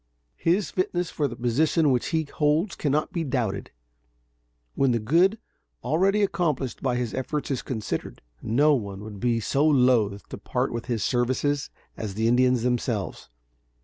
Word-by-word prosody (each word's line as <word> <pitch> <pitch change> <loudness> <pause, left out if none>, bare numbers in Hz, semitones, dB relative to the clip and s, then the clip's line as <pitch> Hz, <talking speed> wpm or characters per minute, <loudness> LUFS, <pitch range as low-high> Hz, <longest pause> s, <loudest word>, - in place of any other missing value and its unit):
His 180 +4 +1
fitness 180 -2 -1
for 145 - 0
the 120 - -7
position 145 +6 +2
which 125 -2 +1
he 160 -1 0
holds 155 +5 0
cannot 150 +1 -1
be 170 - -1
doubted, 120 -8 -2 1.0
when 135 -3 +2
the 115 - +1
good 170 - +3 0.5
already 195 +6 +2
accomplished 155 -9 -1
by 130 -2 0
his 120 -2 -2
efforts 145 +3 -3
is 130 - -1
considered. 110 -5 -5 0.2
No 145 +7 +3
one 100 -7 -3
would 105 -2 -8
be 120 +1 +1
so 135 +6 0
loath 125 -9 +3
to - - -7
part - - -2
with 115 +1 -5
his 120 -4 -1
services 130 +3 0 0.3
as 105 -3 -5
the 110 +1 +1
Indians 125 0 +3
themselves. 120 -4 -2
130 Hz, 155 wpm, -25 LUFS, 115-155 Hz, 1.0 s, good